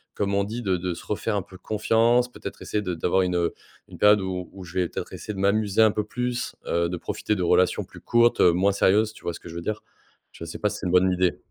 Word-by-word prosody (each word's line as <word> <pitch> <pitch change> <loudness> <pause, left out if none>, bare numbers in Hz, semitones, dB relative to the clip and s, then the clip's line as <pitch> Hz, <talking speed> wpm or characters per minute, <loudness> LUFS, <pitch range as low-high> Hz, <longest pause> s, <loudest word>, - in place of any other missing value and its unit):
comme 100 -1 -1
on 100 0 +2
dit: 115 +4 -5
«de 95 -4 0
de 90 0 -3
se - - -10
refaire 105 +1 -2
un 100 - 0
peu 95 0 -14
de - - -35
confiance», 115 +3 +2
peut-être - - -8
essayer 105 - -2
de 90 -3 -3
d'avoir 90 +3 +1
une, 90 -1 -1
heu, 85 -1 +1 0.4
une - - -11
période, 105 -1 +5
où 90 -2 -4
où 95 -1 -9
je 90 0 -11
vais 90 -2 +1
peut-être - - -6
essayer 105 - -6
de 95 - -7
m'amuser 100 +1 +2
un 110 -1 +6
peu 105 0 -2
plus, 125 +2 -3
heu, 85 0 +1
de 90 - -3
profiter 105 +5 -2
de 90 - -2
relations 90 +1 +3
plus - - -14
courtes, 120 0 +3
heu, 85 - +6
moins 95 +3 +3
sérieuses, 105 +2 +3
tu - - -16
vois 85 - -2
ce - - -9
que 85 - -10
je 85 - -9
veux 85 - -4
dire? 105 +4 -4 0.5
Je 85 - -9
sais 80 - -7
pas 105 - 0
si 105 - -5
c'est - - -7
une - - -1
bonne 90 0 +5
idée. 90 -1 +1
100 Hz, 285 wpm, -25 LUFS, 90-105 Hz, 0.5 s, un